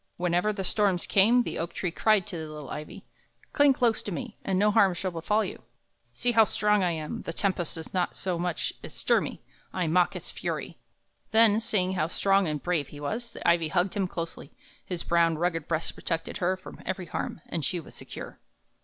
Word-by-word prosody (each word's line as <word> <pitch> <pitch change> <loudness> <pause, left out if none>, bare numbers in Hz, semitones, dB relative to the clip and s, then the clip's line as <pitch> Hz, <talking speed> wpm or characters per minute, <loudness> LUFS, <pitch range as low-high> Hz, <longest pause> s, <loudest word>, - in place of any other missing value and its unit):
Whenever 180 +4 +1
the 200 -2 -4
storms 195 -2 +1
came, 230 +5 +5
the - - -4
oak 165 +1 -3
tree 180 - -1
cried 215 +1 +3
to 200 - -6
the 160 -2 -5
little 150 -3 -8
ivy: 150 0 -7 0.5
"Cling 285 -1 +6
close 240 -4 +2
to 205 - -5
me, 215 +5 -5
and 190 -1 0
no 210 +2 +4
harm 195 -4 +4
shall 185 +1 -2
befall 210 +6 +1
you! - - -7 0.5
See 245 - +1
how 225 -1 +7
strong 210 -1 +2
I 180 - +2
am; 155 -2 -4
the 165 - -5
tempest 185 -3 -1
does 160 -1 -8
not 180 -2 0
so 180 -3 -2
much 175 -1 -1
as - - -8
stir - - +2
me - - -6 0.3
I 180 - -1
mock 175 +2 +3
its - - -6
fury!" - - -4 0.5
Then, 220 -1 +5
seeing 195 -5 +1
how 160 -4 +1
strong 195 +2 +2
and 150 -2 -3
brave 170 -6 0
he 145 - -11
was, 225 +11 -4
the - - -4
ivy 170 -1 +4
hugged 180 +3 +1
him 195 -2 0
closely; 165 -5 -6 0.3
his 180 -2 -4
brown, 170 -1 +3
rugged 165 -2 -1
breast 165 -1 -1
protected 165 -2 -3
her 185 +1 +1
from 185 - -11
every 190 -1 -3
harm, 170 - -4
and 165 - -2
she 175 +6 -1
was 160 - -11
secure. - - -9
180 Hz, 210 wpm, -28 LUFS, 165-205 Hz, 0.5 s, how